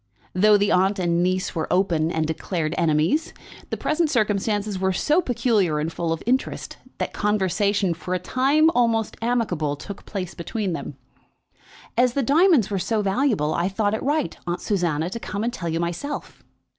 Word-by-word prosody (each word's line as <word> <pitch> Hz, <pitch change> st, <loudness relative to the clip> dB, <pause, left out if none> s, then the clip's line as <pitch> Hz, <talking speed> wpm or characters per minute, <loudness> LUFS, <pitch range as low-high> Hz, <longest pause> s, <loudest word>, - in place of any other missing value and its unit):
Though 210 Hz, +3 st, +5 dB
the 205 Hz, 0 st, +1 dB
aunt 190 Hz, +3 st, +3 dB
and 175 Hz, -2 st, +1 dB
niece 185 Hz, +1 st, 0 dB
were 160 Hz, -2 st, -3 dB
open 170 Hz, -4 st, +2 dB
and 160 Hz, -2 st, 0 dB
declared 160 Hz, 0 st, -2 dB
enemies, 165 Hz, -, +1 dB, 0.3 s
the -, -, -3 dB
present 310 Hz, +1 st, 0 dB
circumstances 210 Hz, -3 st, 0 dB
were 190 Hz, 0 st, +1 dB
so 305 Hz, -, +2 dB
peculiar 230 Hz, -, +1 dB
and 155 Hz, +2 st, -2 dB
full 170 Hz, -1 st, -2 dB
of 165 Hz, -, -3 dB
interest 255 Hz, +3 st, -1 dB, 0.2 s
that -, -, -3 dB
conversation, 200 Hz, -2 st, +1 dB
for 180 Hz, +2 st, -4 dB
a -, -, +2 dB
time 275 Hz, -, +3 dB
almost 230 Hz, -5 st, +1 dB
amicable, 210 Hz, -11 st, 0 dB
took 195 Hz, +7 st, -9 dB
place 185 Hz, -3 st, -4 dB
between 190 Hz, +2 st, -3 dB
them. 155 Hz, -4 st, -5 dB, 1.0 s
"As 245 Hz, +1 st, +3 dB
the 275 Hz, -, 0 dB
diamonds 295 Hz, -, +4 dB
were 195 Hz, -, 0 dB
so 210 Hz, +4 st, 0 dB
valuable, 195 Hz, -, +1 dB
I 175 Hz, +2 st, 0 dB
thought 205 Hz, +1 st, 0 dB
it 220 Hz, -, -2 dB
right, 295 Hz, +1 st, 0 dB
Aunt 175 Hz, +1 st, -2 dB
Susanna, 170 Hz, -6 st, 0 dB
to 230 Hz, -, -4 dB
come 205 Hz, -2 st, -4 dB
and 240 Hz, +1 st, -1 dB
tell 170 Hz, -8 st, -4 dB
you 165 Hz, +1 st, -1 dB
myself." 175 Hz, -, -4 dB
200 Hz, 175 wpm, -23 LUFS, 170-230 Hz, 1.0 s, Though